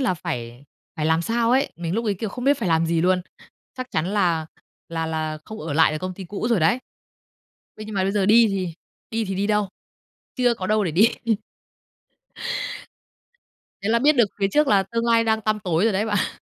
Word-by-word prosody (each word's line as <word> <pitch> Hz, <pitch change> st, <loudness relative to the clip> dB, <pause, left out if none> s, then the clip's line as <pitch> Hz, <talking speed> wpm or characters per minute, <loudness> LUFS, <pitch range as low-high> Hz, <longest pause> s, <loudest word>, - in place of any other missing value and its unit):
là 250 Hz, -9 st, +1 dB
phải 120 Hz, -3 st, -6 dB, 0.3 s
phải 155 Hz, -1 st, -1 dB
làm 160 Hz, +1 st, +2 dB
sao 230 Hz, +4 st, +1 dB
ấy. 265 Hz, +2 st, +2 dB
Mình 170 Hz, +1 st, -3 dB
lúc 230 Hz, +2 st, -1 dB
ấy, 210 Hz, -3 st, +1 dB
kiểu, 215 Hz, +3 st, -4 dB
không 245 Hz, +5 st, -6 dB
biết 280 Hz, 0 st, +3 dB
phải 215 Hz, -, -1 dB
làm 165 Hz, 0 st, +2 dB
gì 165 Hz, 0 st, +1 dB
luôn. 180 Hz, +1 st, +2 dB, 0.5 s
Chắc 255 Hz, -1 st, -4 dB
chắn 155 Hz, +2 st, 0 dB
là 175 Hz, -6 st, +1 dB, 0.4 s
là 165 Hz, -1 st, -2 dB
là 155 Hz, -1 st, -3 dB
không 215 Hz, -, -8 dB
ở 155 Hz, -1 st, -4 dB
lại 160 Hz, +1 st, +4 dB
được 155 Hz, -, -2 dB
công 185 Hz, +1 st, -5 dB
ty 190 Hz, -, -8 dB
cũ 200 Hz, +5 st, -4 dB
rồi 230 Hz, -6 st, +2 dB
đấy. 220 Hz, +11 st, +3 dB, 1.0 s
Thế 215 Hz, -, -7 dB
nhưng 215 Hz, -1 st, -7 dB
mà 190 Hz, -, +1 dB
bây 195 Hz, -, +1 dB
giờ 200 Hz, -1 st, +1 dB
đi 225 Hz, +3 st, +6 dB
thì 185 Hz, -4 st, -2 dB, 0.4 s
đi 225 Hz, 0 st, -1 dB
thì 195 Hz, -1 st, -3 dB
đi 200 Hz, +2 st, 0 dB
đâu? 210 Hz, -2 st, +1 dB, 0.7 s
Chưa 245 Hz, -2 st, +3 dB
có 185 Hz, -5 st, -5 dB
đâu 215 Hz, 0 st, +2 dB
để 170 Hz, -, -1 dB
đi. 195 Hz, +9 st, +5 dB, 2.7 s
Thế 200 Hz, -, -1 dB
là 235 Hz, -, +4 dB
biết 295 Hz, +5 st, +5 dB
được 235 Hz, -4 st, +4 dB
phía 195 Hz, -, +3 dB
trước 300 Hz, +7 st, +2 dB
là 200 Hz, -4 st, +4 dB
tương 230 Hz, +4 st, -3 dB
lai 230 Hz, -1 st, +4 dB
đang 220 Hz, -1 st, +1 dB
tăm 215 Hz, 0 st, 0 dB
tối 180 Hz, 0 st, +1 dB
rồi 225 Hz, -, +3 dB
đấy 205 Hz, +3 st, 0 dB
bạn. 205 Hz, -1 st, -1 dB
195 Hz, 220 wpm, -23 LUFS, 165-225 Hz, 2.7 s, đi